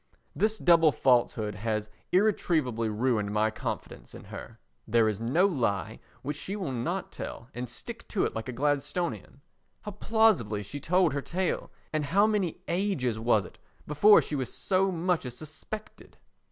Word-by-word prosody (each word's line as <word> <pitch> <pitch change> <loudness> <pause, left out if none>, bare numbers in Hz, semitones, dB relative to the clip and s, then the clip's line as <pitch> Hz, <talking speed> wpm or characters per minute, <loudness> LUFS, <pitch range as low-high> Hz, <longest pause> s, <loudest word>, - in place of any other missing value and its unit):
This 215 +1 +2
double 165 -5 +5
falsehood 120 -5 +2
has 105 +1 -2 0.2
irretrievably 160 - +2
ruined 110 -2 0
my 110 +1 +2
confidence - - -6
in - - -10
her. 115 0 -10 0.3
There 115 0 +4
is 105 -2 -1
no 135 +11 +3
lie 110 - -1 0.2
which 145 +2 -3
she 195 +6 -4
will 185 -9 -3
not 165 +10 -3
tell 115 - -7
and 125 0 -5
stick 235 - -8
to 205 - 0
like 110 +2 -6
a - - -1
Gladstonian. 145 +3 -2 0.4
How 210 - -5
plausibly 195 - +2
she 100 +9 -7
told 175 +1 +2
her 140 - -1
tale, 180 +5 -2 0.2
and 155 -1 +1
how 195 +8 +4
many 205 -6 -1
ages 170 - 0
was 110 -4 +2
it - - -14 0.3
before 205 +9 +6
she 150 - -4
was 130 -4 -3
so 190 0 +1
much 175 0 0
as 125 -1 -6
suspected! 155 +9 -9
145 Hz, 160 wpm, -28 LUFS, 115-185 Hz, 0.4 s, before